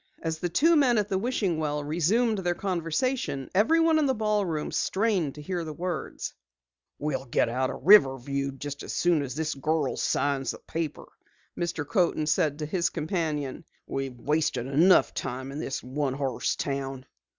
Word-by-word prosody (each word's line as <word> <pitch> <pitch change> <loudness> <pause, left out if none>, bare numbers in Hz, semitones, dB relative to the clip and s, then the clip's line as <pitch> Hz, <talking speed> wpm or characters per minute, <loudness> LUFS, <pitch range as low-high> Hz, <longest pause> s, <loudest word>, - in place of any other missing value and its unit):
As 160 -1 -2
the 175 - -1
two 325 - +4
men 260 -6 +4
at 210 -1 0
the 190 - +1
wishing 200 -7 0
well 150 -1 -1
resumed 195 +9 +1
their 175 -2 0
conversation, 175 - -2
everyone 320 - +4
in 295 - +2
the 265 - +1
ballroom 205 -8 0
strained 190 -8 0
to 150 - -9
hear 175 +1 -2
the 155 -1 -6
words. 175 +1 -4 0.6
"We'll 135 -3 -2
get 120 - +1
out 130 +2 0
of - - -6
Riverview 140 -6 +5
just 140 +1 -6
as - - -6
soon 175 -3 +2
as 130 -2 -5
the 155 -3 -2
girl 155 -2 0
signs 140 -1 0
the - - -3
paper," 160 -2 -5 0.5
Mr. 170 -4 -3
Coaten 175 -5 +1
said 150 -2 +1
to 150 - -3
his 170 +3 0
companion. 155 -4 -2 0.2
"We've 135 -2 -4
wasted 150 -2 0
enough 160 +8 +4
time 130 +2 -4
in 140 - -6
this 135 - -4
one 135 +1 -2
horse 135 -3 -1
town." 135 -2 -3
155 Hz, 170 wpm, -27 LUFS, 140-190 Hz, 0.6 s, Riverview